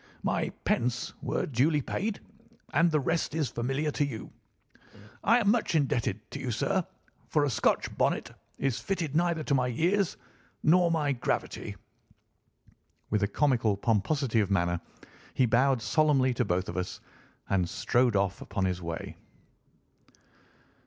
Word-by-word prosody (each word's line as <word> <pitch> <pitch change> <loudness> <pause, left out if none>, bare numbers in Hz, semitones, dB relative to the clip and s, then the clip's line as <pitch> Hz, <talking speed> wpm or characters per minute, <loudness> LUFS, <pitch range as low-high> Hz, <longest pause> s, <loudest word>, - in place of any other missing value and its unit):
My - - 0 0.2
pence 125 +1 0
were - - -1
duly 145 +4 +2
paid, 205 - -3 0.5
and 170 +1 +4
the 155 -2 +2
rest 160 +1 -1
is 155 -5 0
familiar 135 +6 -1
to 145 - 0
you. 125 -6 -5 0.9
I 230 +4 +5
am 210 -4 +3
much 220 -7 +1
indebted 120 -8 +1
to 140 - -5
you, 130 -2 -3
sir, 175 +10 0 0.4
for 150 -2 +2
a 140 - 0
Scotch 110 - +1
bonnet - - +1 0.3
is 135 -3 0
fitted 170 -7 -2
neither 170 -1 +1
to 140 - 0
my 125 -2 +2
years 175 - +1 0.5
nor 175 +2 +5
my 155 -4 +1
gravity." 125 -3 -2 1.4
With 105 0 +2
a 100 - +2
comical 115 -4 +2
pomposity 115 +3 +1
of 100 -2 +1
manner 85 -3 +1 0.5
he 130 - +4
bowed 125 +1 +3
solemnly 140 -4 +3
to 125 0 0
both 90 0 0
of 85 - -5
us 90 - -3 0.5
and 90 -3 +1
strode 120 +4 +2
off 100 -1 0
upon 100 -2 -2
his 90 -1 -1
way. 85 -1 -5
130 Hz, 145 wpm, -29 LUFS, 110-155 Hz, 1.4 s, I